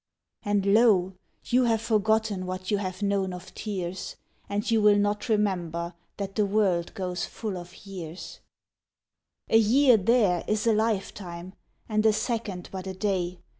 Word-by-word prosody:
And 205 -1 0
lo! 200 -3 +4 0.3
you 250 +1 +3
have 225 -2 +2
forgotten 220 -3 +1
What 185 +1 -4
you 205 - +3
have 185 0 -4
known 195 -2 0
of 180 0 -10
tears, 190 -4 -5 0.3
And 205 +2 -1
you 225 -1 +3
will 210 -1 +6
not 205 +2 0
remember 175 -5 0 0.2
That 195 -1 -4
the 210 0 +2
world 195 -4 +1
goes 180 -2 -3
full 215 -4 -5
of 180 +2 -10
years; 180 -3 -8 1.1
A 225 - +5
year 245 +3 +5
there 200 -4 +2
is 215 0 0
a 230 - +4
lifetime, 190 -5 -2 0.3
And 215 -1 +1
a 215 - +5
second 215 -6 -3
but 190 0 -6
a 190 - -5
day. 185 -3 -2
200 Hz, 155 wpm, -27 LUFS, 185-215 Hz, 1.1 s, will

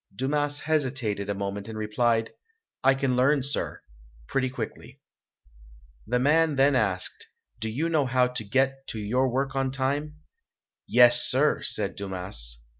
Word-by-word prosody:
Dumas 145 +4 -1
hesitated 130 -10 -1
a 100 - -1
moment 100 +1 -4
and 110 -1 -7
replied, 115 +1 0 0.5
"I 135 0 +5
can 135 -2 0
learn, 135 +2 +3
sir, 140 +1 -3 0.4
pretty 130 -1 0
quickly". 130 - -7 1.1
The 125 +3 +1
man 150 +4 +3
then 135 +1 +4
asked, 100 -6 -2 0.3
"Do 110 - -3
you 140 +9 -1
know 155 -5 +1
how 125 0 +3
to 125 -2 -4
get 135 +5 0
to 110 - -5
your 125 +6 +1
work 135 +2 -1
on 135 0 0
time?" 140 +3 -2 0.7
"Yes, 120 0 +6
sir!" 145 +4 +2
said 100 -2 0
Dumas. 90 -12 -3
130 Hz, 145 wpm, -26 LUFS, 110-135 Hz, 1.1 s, Yes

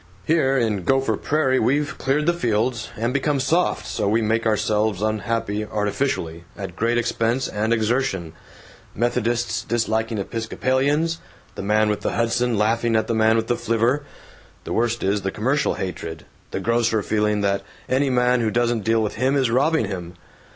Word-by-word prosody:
Here 135 -5 +2
in 110 -6 0
Gopher 135 +7 +2
Prairie 140 -4 +1
we've 145 +5 +1
cleared 140 +3 +1
the 175 - +3
fields, 120 -5 -1
and 115 +3 -1
become 140 0 +1
soft, 165 +7 +1
so - - -2
we 110 +3 +3
make 115 +1 +1
ourselves 105 -2 +1
unhappy 110 0 -1
artificially, 105 - -2
at 95 -4 -6
great 115 +4 +1
expense 120 +1 0
and 110 +2 -2
exertion: 110 -7 0 0.6
Methodists 120 0 0
disliking 110 -1 -1
Episcopalians, 130 +9 0 0.3
the - - -6
man 105 +2 +2
with 105 -1 -1
the - - -1
Hudson 115 0 +1
laughing 115 +2 +1
at 110 - +2
the - - -1
man 110 0 +3
with 115 0 +1
the 120 - 0
flivver. 120 +4 +1 0.6
The - - -4
worst 120 0 0
is 100 +1 +1
the 95 - -1
commercial 130 +9 0
hatred 80 -4 -5 0.2
the - - -3
grocer 115 -2 +1
feeling 105 0 +1
that 100 -1 +1 0.3
any 135 +2 +1
man 125 -1 +2
who 110 - +1
doesn't 120 -1 0
deal 115 +1 +2
with 105 0 -3
him 130 +4 +2
is 130 -4 +2
robbing 140 +2 +2
him. 90 -3 -6
115 Hz, 165 wpm, -22 LUFS, 105-130 Hz, 0.6 s, the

